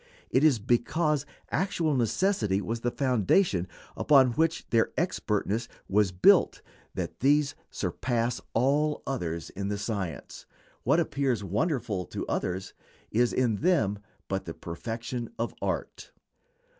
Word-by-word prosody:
It 130 - +3
is 150 -6 +5
because 145 +7 +1 0.2
actual 170 -5 0
necessity 120 - +1
was 115 +4 -3
the 120 - 0
foundation 125 - +2 0.3
upon 135 -4 +5
which 160 +6 0
their 115 -1 +3
expertness 115 - -1 0.2
was 100 -1 +2
built 90 0 +4 0.3
that - - -4
these 145 +2 +3 0.2
surpass 120 -1 -1
all 145 +5 +2
others 85 - -3
in 100 0 -4
the 105 0 -1
science. 100 - -5 0.3
What 165 - +3
appears 135 -8 0
wonderful 105 - -1
to - - -5
others 95 +2 -3 0.4
is 120 +2 +3
in 120 -5 +1
them 140 - +2 0.3
but 95 0 -2
the 80 - -6
perfection 115 +7 -5
of - - -2
art. - - -3
120 Hz, 125 wpm, -28 LUFS, 100-145 Hz, 0.4 s, is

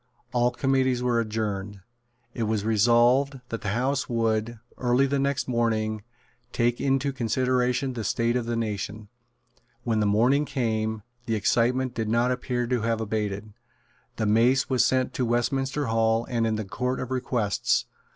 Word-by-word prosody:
All 120 0 +3
committees 130 -1 +1
were 120 -1 +2
adjourned. 105 -3 -3 0.5
It 115 - -2
was 110 -2 -1
resolved 120 +5 +3
that 115 - -4
the 105 - -2
House 135 +3 0
would, 115 0 0 0.2
early 125 +2 +3
the 140 0 0
next 140 -1 0
morning, 110 -3 0 0.5
take 120 0 0
into 135 0 +1
consideration 130 +1 0
the 115 -2 -4
state 115 +3 0
of 120 -2 -1
the 120 - -1
nation. 105 -1 -4 0.7
When 115 -2 0
the 105 - +2
morning 125 +8 +3
came, 110 -6 -2 0.2
the 115 - +1
excitement 120 +4 +1
did 110 -2 -2
not 120 +2 +2
appear 125 -1 -1
to 120 -1 0
have 115 0 0
abated. 105 -1 -3 0.6
The 110 - -1
mace 120 +6 +3
was 125 -2 +4
sent 130 0 +2
into 130 - -3
Westminster 135 +4 0
Hall 115 0 +1
and 115 -2 0
into 110 -1 -1
the - - -13
Court 125 +4 -2
of 130 - -5
Requests. 120 -5 0
120 Hz, 160 wpm, -26 LUFS, 110-130 Hz, 0.7 s, was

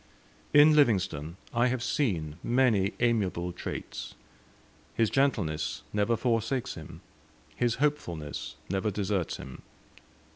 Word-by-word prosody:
In 150 +1 +7
Livingstone 90 - +2 0.2
I 120 +1 +3
have 125 -1 -1
seen 85 - -1
many 115 -6 +2
amiable 95 -7 +1
traits. - - -6 0.8
His 115 -2 +2
gentleness 110 - 0
never 105 +3 +2
forsakes 120 +2 0
him; - - -10 0.5
his 120 -1 +1
hopefulness 90 - -2
never 95 +3 0
deserts 100 -3 -1
him. 65 - -9
110 Hz, 105 wpm, -29 LUFS, 90-125 Hz, 0.8 s, In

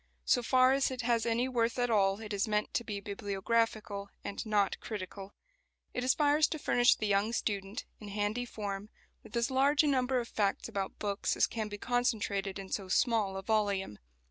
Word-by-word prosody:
So 245 - +3
far 255 +2 +4
as 275 0 +2
it 255 -1 -4
has 235 -1 +1
any 235 +2 +1
worth 235 -2 0
at 245 -1 +1
all 195 -1 +2
it 215 -1 -6
is 200 +3 0
meant 210 0 0
to 235 - 0
be 205 -3 -4
bibliographical 205 +1 -1
and 200 - -4
not 205 -2 +1
critical. 195 -1 -7 0.6
It 250 - -2
aspires 290 +3 +4
to 315 - -4
furnish 245 -4 +4
the 215 - -3
young 205 +2 +1
student, 200 -1 -2
in 210 - -9
handy 205 +4 -1
form, 205 -3 -5 0.3
with 225 - -6
as 235 +2 +1
large 280 +3 +4
a - - +2
number 260 -2 +2
of 235 - -4
facts 200 -3 -1
about 195 -1 -4
books 200 -1 -1
as - - +5
can 220 -2 -4
be 205 0 -6
concentrated 210 -5 -1
in 195 -1 -8
so 195 -2 -2
small 210 -1 +1
a 195 - -5
volume. 200 - 0
215 Hz, 195 wpm, -32 LUFS, 200-245 Hz, 0.6 s, as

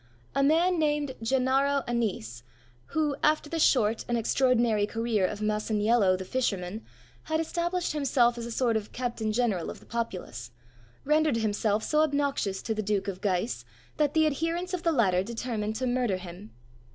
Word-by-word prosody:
A 275 - +1
man 330 +5 +3
named 295 -3 0
Gennaro 270 +3 +2
Annese, 195 - -2 0.5
who, 305 -3 0
after 305 -1 +2
the 330 - -1
short 225 -7 +3
and 240 - 0
extraordinary 230 -3 +2
career 225 -4 0
of 210 +2 -6
Masaniello 210 -1 +2
the 190 - -6
fisherman, 200 -3 -2 0.4
had 315 0 0
established 345 +2 -1
himself 255 -5 +2
as 235 -1 -5
a - - -6
sort 235 -1 +1
of 215 -1 -3
captain 240 -3 -2
general 215 -7 0
of - - -8
the - - -18
populace, 185 - -5 0.6
rendered 300 -3 +3
himself 215 -1 0
so 305 - +1
obnoxious 280 -10 0
to 220 - -1
the 215 - -2
Duke 205 -1 -1
of 190 -1 -4
Guise, 190 - -1 0.3
that 295 0 +1
the 315 0 +5
adherents 330 +5 -1
of 360 - -1
the 335 - +2
latter 195 - +3
determined 220 0 -3
to 255 - -2
murder 245 -6 +1
him. 185 +3 -10
235 Hz, 165 wpm, -28 LUFS, 210-285 Hz, 0.6 s, the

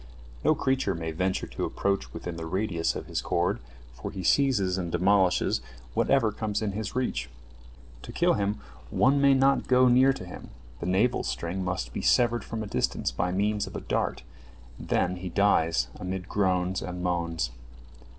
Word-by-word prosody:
No - - +4
creature 130 -7 0
may 80 -1 -4
venture 95 +3 -1
to - - -5
approach 100 0 -1
within 85 - -6
the 80 0 -5
radius 95 -2 -1
of - - -5
his - - -3
cord, - - 0 0.3
for 60 - -6
he 95 - -6
seizes 100 -6 +3
and 85 -2 -3
demolishes 95 -1 +2 0.3
whatever 120 - +3
comes 110 0 -2
in 105 - -1
his 105 +1 -5
reach. 65 - -1 0.7
To - - -9
kill - - +3
him, 100 +1 -1 0.3
one 140 +2 +3
may 140 -1 +6
not 135 +1 +3
go 130 0 +5
near 130 +2 +6
to 135 -9 -6
him, 90 - -10 0.3
the 85 - -4
navel 105 +7 +2
string 90 +3 -3
must 85 -10 -3
be - - -3
severed 120 -1 +3
from 110 -1 -4
a - - -5
distance 100 - -1
by 90 0 -1
means 105 +2 0
of - - -9
a - - -4
dart, - - -2 0.6
and - - -9
then 90 +1 +1
he 90 0 -5
dies 80 -8 +2
amid 95 0 -4
groans 95 -2 0
and 90 0 -5
moans. 85 -7 -1
95 Hz, 180 wpm, -27 LUFS, 90-110 Hz, 0.7 s, may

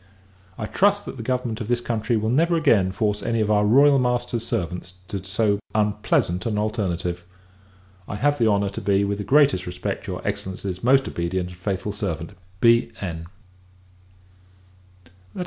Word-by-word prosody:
I 110 - -3
trust, 205 - +2
that - - -7
the - - -6
government 120 -1 -2
of 110 - -4
this 120 0 +1
country 115 -1 -1
will 110 +1 0
never 165 +6 +3
again 115 - +3
force 105 +1 -1
any 115 -1 -1
of 110 -1 +1
our 105 -1 +3
Royal 140 +6 +5
Master's 120 -2 -1
servants 90 -2 -4
to 95 -2 -4
so 100 +2 0 0.2
unpleasant 105 -3 +1
an 105 -2 -1
alternative. 90 -5 -2 0.8
I - - -5
have 145 +7 +1
the 115 - +3
honour 100 -2 +2
to 100 - -6
be, 100 0 +2
with 100 0 -2
the - - -2
greatest 140 -9 +3
respect, 90 - -4
your - - -5
Excellency's 95 -1 -4
most 135 +2 +4
obedient 90 +1 -2
and 90 - -11
faithful 95 +1 -2
servant, 85 -5 -4 0.3
B.N. 95 -8 +1
105 Hz, 160 wpm, -23 LUFS, 95-120 Hz, 0.8 s, Royal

